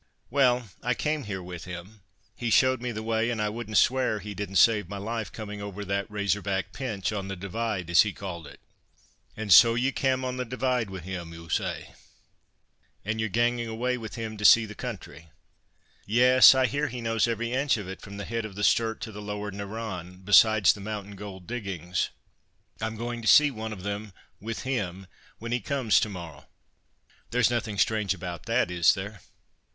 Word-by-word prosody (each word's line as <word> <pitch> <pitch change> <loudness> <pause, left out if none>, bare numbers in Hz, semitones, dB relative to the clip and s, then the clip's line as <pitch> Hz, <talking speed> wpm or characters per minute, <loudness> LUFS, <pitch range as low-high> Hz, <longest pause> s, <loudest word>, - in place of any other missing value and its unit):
"Well, 125 -3 +3
I 125 0 0
came 150 -1 -1
here 95 -3 -5
with 90 -1 -8
him. 90 +4 -9 0.3
He 120 - -3
showed 130 +2 +4
me 125 -1 -2
the 110 -1 -5
way, 115 +1 0
an 115 -2 -2
I 105 0 0
wouldn't 110 -1 -3
swear 125 -3 +3
he 105 0 -7
didn't 100 0 -5
save 105 -4 +4
my 100 - -5
life, 110 +2 -4
coming 105 -2 -7
over 100 0 -6
that 100 0 -2
Razor 105 -1 0
back 95 0 -2
pinch, 110 -9 -3
on 100 -2 -4
the 95 - -4
Divide, 100 0 -3
as 85 +1 +6
he 105 - 0
called 85 -5 -7
it." - - -13 0.8
"And 105 -3 +3
so 115 +4 +8
ye 130 +3 +1
cam' 130 -1 0
on 130 0 -3
the 125 - -1
Divide 125 -2 -1
wi' 95 -1 -7
him, 90 -1 -6
ou, 85 0 -11
ay? - - -5 1.1
And 110 +1 -2
ye're 110 0 0
gangin' 120 +2 +1
awa' 125 +3 -1
wi' 110 - -6
him 110 -2 -6
to 105 - -7
see 110 +2 +7
the 105 - -9
country?" 90 - -8 0.8
"Yes! 125 +4 +7
I 130 0 +3
hear 145 +3 0
he 125 -1 -6
knows 115 0 +1
every 115 0 -2
inch 135 -1 +2
of 105 -3 -6
it 95 - -8
from 100 0 -9
the 100 - -5
head 115 0 -3
of 105 -3 -8
the 105 - -4
Sturt 110 +1 +2
to 110 - -5
the 105 0 -8
Lower 105 0 -5
Narran, 95 -3 -6
besides 105 0 +6
the 105 - -11
mountain 105 -1 -6
gold 95 -2 -9
diggings. 95 -7 -3 0.7
I'm 110 0 -2
going 120 +1 -4
to 110 - -5
see 145 +8 +7
one 110 -2 -6
of 95 -4 -8
them, 100 0 -4 0.3
with 115 +2 -5
him, 95 -8 -3 0.3
when 115 +1 -7
he 120 - +1
comes 125 -7 +2
to 110 - -1
morrow. 85 -7 -9 0.8
There's 120 0 +2
nothing 110 -3 -2
strange 105 -2 +1
about 85 -2 -7
that, 90 - +1
is 85 -1 +4
there?" 100 +1 -7
110 Hz, 200 wpm, -27 LUFS, 95-120 Hz, 1.1 s, so